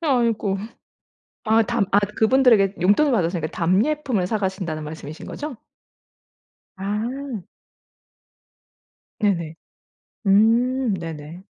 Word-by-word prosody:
아이고. 235 - +1 0.9
아 225 0 +4
답 235 -2 0 0.3
그분들에게 220 -4 +4
용돈을 210 +11 +4
받았으니까 170 -7 0
답례품을 210 - 0
사가신다는 190 -7 -2
말씀이신 155 0 -8
거죠? 290 -4 -6 1.2
아. 220 +3 -4 1.8
네네. 170 -6 0 0.7
음 230 +4 +3
네네. 165 0 -7
205 Hz, 200 characters per minute, -22 LUFS, 180-245 Hz, 1.8 s, 아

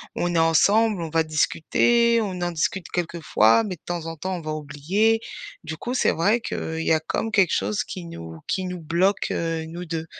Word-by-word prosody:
on 175 0 -1
est 170 - +3
ensemble, 200 +6 +3
on 165 - -4
va 165 +1 +2
discuter, 230 +9 +2
on 190 -4 -3
en 175 0 -1
discute 170 +2 -2
quelques 170 -1 -3
fois, 155 - +4
mais 190 -3 -4
de 160 - -28
temps 175 -2 -4
en 165 0 -5
temps 185 +4 -4
on - - -7
va 155 -1 -4
oublier. 155 +10 +1 0.5
Du 160 - -4
coup, 245 +10 -5
c'est - - +2
vrai 205 +8 +2
qu'il 160 -7 -4
y - - +4
a 155 - +2
comme, 220 +7 -2
quelque 190 -5 +4
chose 210 - 0
qui 180 -2 -7
nous 80 - -9
qui 190 - -1
nous 180 -1 -5
bloque, 170 +5 +1
heu, 165 -1 -2
nous 170 +2 -7
2. 165 -2 -4
170 Hz, 220 wpm, -24 LUFS, 160-200 Hz, 0.5 s, fois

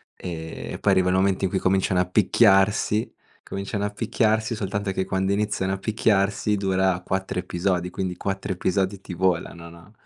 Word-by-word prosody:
ehm, 80 -2 -6
e - - -4
poi 100 - +2
arrivano 95 -1 +3
i - - +3
momenti 95 0 +1
in 95 - 0
cui 95 - -1
cominciano 95 -1 +1
a - - 0
picchiarsi. 105 +2 +3 0.4
Cominciano 100 +1 -3
a - - -1
picchiarsi, 110 +1 0
soltanto 100 -1 -2
che 95 - 0
quando 95 +1 0
iniziano 100 -2 -1
a - - -2
picchiarsi 105 0 +1
dura 95 -2 +1
4 95 +1 -3
episodi, 90 0 -1
quindi 90 -1 -3
4 95 +1 -3
episodi 95 +2 -1
ti 90 - -8
volano, 85 -2 -1
no, 85 +3 -16
95 Hz, 175 wpm, -24 LUFS, 90-100 Hz, 0.4 s, arrivano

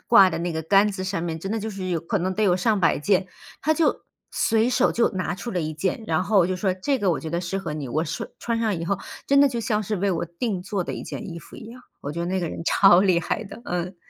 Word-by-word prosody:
挂 195 -5 +7
的 - - -3
那 170 0 -2
个 160 - -2
杆 200 +5 +4
子 185 - -5
上 185 -3 -2
面， 165 -2 -3
真 195 - -5
的 225 - 0
就 220 +1 -4
是 190 -2 -5
有 170 -2 0
可 185 +5 -1
能 185 +1 -1
得 215 - 0
有 180 -3 +4
上 210 +2 +2
百 165 - +3
件。 185 +4 +2 0.4
他 315 - +3
就 330 - +1 0.3
随 225 +1 +2
手 245 - +3
就 235 - +3
拿 185 0 -2
出 235 +5 -6
了 180 -4 -1
一 155 0 -3
件， 190 +7 -2
然 165 +3 +1
后 195 -4 +4
就 185 0 -1
说： 185 -1 0
“这 275 +4 +1
个 195 -4 +2
我 - - 0
觉 160 - -6
得 170 +1 -1
适 180 +2 -3
合 175 -6 -4
你”， 145 -4 -5
我 155 +6 0
说 165 +1 -4
穿 230 -1 -2
上 210 -6 0
以 165 - -4
后 200 +2 -1 0.3
真 280 0 +5
的 285 - +6
就 235 -2 -3
像 215 -1 0
是 210 +1 -2
为 195 +1 0
我 170 -1 -1
订 180 +2 -3
做 190 -2 -2
的 - - -4
一 - - -5
件 - - -6
衣 170 - -6
服 - - -13
一 - - -10
样， 245 +2 -12 0.2
我 145 - -4
觉 170 - -4
得 170 - -1
那 190 +1 0
个 170 -3 -2
人 - - -6
超 190 0 +6
厉 185 -3 +4
害 210 +5 -2
的， 225 +4 -11
嗯。 180 +1 -3
185 Hz, 320 characters per minute, -24 LUFS, 170-215 Hz, 0.4 s, 挂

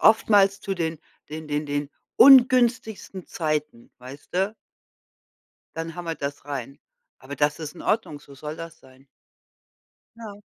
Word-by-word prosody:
oftmals 200 -2 +4
zu 195 -1 -3
den 160 -2 -3 0.3
den 155 0 -7
den 150 0 -2
den 145 0 -3 0.3
ungünstigsten 240 -7 +5
Zeiten, 150 -6 -3
weißt 130 +6 -12
du? 195 +3 0 1.2
Dann 165 0 -5
hämmert 170 -3 -6
das 140 0 -4
rein. 140 0 -6 0.4
Aber 140 +2 -9
das 145 0 +1
ist 155 0 -7
in - - -11
Ordnung, 180 -10 -1
so 140 -1 -15
soll 150 +3 -7
das 165 -1 -9
sein. 130 +1 -20 1.1
Ja, 225 -3 -9
160 Hz, 140 wpm, -24 LUFS, 145-195 Hz, 1.2 s, ungünstigsten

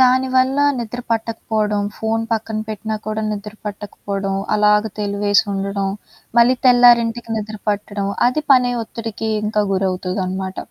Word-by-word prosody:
దానివల్ల 260 +1 +3 0.2
నిద్ర 240 0 -4
పట్టకపోడం, 220 -2 -1 0.2
ఫోన్ 225 0 -1
పక్కన 220 -1 -1
పెట్టినా 215 0 -3
కూడా 215 0 -2
నిద్ర 210 0 -5
పట్టకపోడం. 200 -1 -4 0.2
అలాగ 210 0 +4 0.2
తెలివేసి 205 0 +2
ఉండడం. 195 0 -2 0.5
మళ్ళీ 245 +2 +5
తెల్లారింటికి 240 -2 +5
నిద్ర 215 0 -6
పట్టడం. 205 -1 -3 0.2
అది 305 +4 -1
పనే 250 -1 +4
ఒత్తిడికి 225 0 -5 0.2
ఇంకా 210 0 +1
గురవుతుదనమాట. 185 0 -2
215 Hz, 120 wpm, -19 LUFS, 200-235 Hz, 0.5 s, మళ్ళీ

